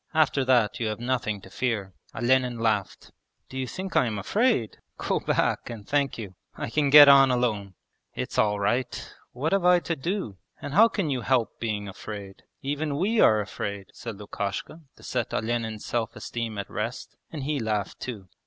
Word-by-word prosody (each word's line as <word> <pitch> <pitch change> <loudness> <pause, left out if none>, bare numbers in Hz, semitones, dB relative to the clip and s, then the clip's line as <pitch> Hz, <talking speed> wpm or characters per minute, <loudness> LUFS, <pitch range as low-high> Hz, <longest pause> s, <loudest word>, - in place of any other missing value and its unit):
After 150 -3 +3
that 120 -5 +3
you 115 - -1
have 110 0 -3
nothing 120 -4 -1
to 95 - -13
fear.' 105 -7 -2 0.2
Olenin 125 0 +2
laughed. 110 -4 -1 0.4
'Do 130 - -5
you 130 - -2
think 190 +7 -6
I 125 - +4
am 110 -2 -3
afraid? 200 - +1 0.2
Go - - 0
back, - - 0
and 110 -4 -8
thank 140 -1 +1
you. 105 -5 -7 0.2
I - - -5
can 145 0 +2
get 145 0 +11
on 135 -1 +8
alone.' 110 -6 0 0.4
'It's - - -3
all 105 -1 +2
right! 120 +5 -1 0.2
What 145 +6 -2
have 195 -2 +2
I 180 0 +6
to 165 - -2
do? 160 - -3 0.2
And 145 - -6
how 215 +7 +7
can 195 -9 -2
you 130 -2 -1
help 120 -3 0
being 105 -3 -2
afraid? 100 0 -8 0.2
Even 145 +1 -2
we 210 +7 +1
are 110 -1 +5
afraid,' 100 -1 -5
said 115 -3 -7
Lukashka 100 - -5
to - - -18
set 120 -3 -2
Olenin's 110 -1 -2
self 115 -2 -2
esteem 115 -2 -5
at 100 - -4
rest, 115 +4 -5 0.2
and 150 -4 -5
he 145 +1 -1
laughed 110 -3 -2
too. 105 -7 -6
120 Hz, 185 wpm, -26 LUFS, 105-140 Hz, 0.4 s, get